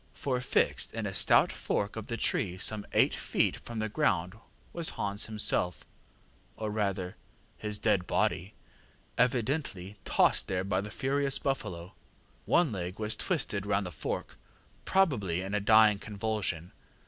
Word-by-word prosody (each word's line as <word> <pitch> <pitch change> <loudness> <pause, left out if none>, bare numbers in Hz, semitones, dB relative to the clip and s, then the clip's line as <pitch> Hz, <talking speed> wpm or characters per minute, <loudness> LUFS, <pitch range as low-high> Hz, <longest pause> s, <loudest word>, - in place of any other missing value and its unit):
ŌĆ£For 125 -2 -1
fixed 125 - +1
in 115 -1 -2
a 95 - -3
stout - - +5
fork 100 +1 -2
of 110 -2 -6
the 115 - -3
tree 95 -4 0
some 105 +2 0
eight - - +4
feet - - +1
from 120 - -8
the 110 0 -1
ground 90 -3 +1 0.4
was 170 -2 +1
Hans 100 +1 -2
himself, 105 -5 0 0.7
or 110 -1 -3
rather 100 -4 -2 0.4
his 105 -1 -2
dead 90 -3 +1
body, 95 +5 0 0.6
evidently 120 - 0
tossed - - +2
there 95 -1 -1
by 95 -1 0
the 105 - -6
furious 140 +4 0
buffalo. 90 -10 -3 0.5
One 170 -6 +3
leg 90 -2 -4
was 110 0 0
twisted 110 - -1
round 100 -1 +1
the 90 - -5
fork, - - -4 0.5
probably 105 - +2
in 95 +1 -5
a 105 - +2
dying 110 0 +5
convulsion. 105 -5 -3
105 Hz, 150 wpm, -30 LUFS, 95-115 Hz, 0.7 s, stout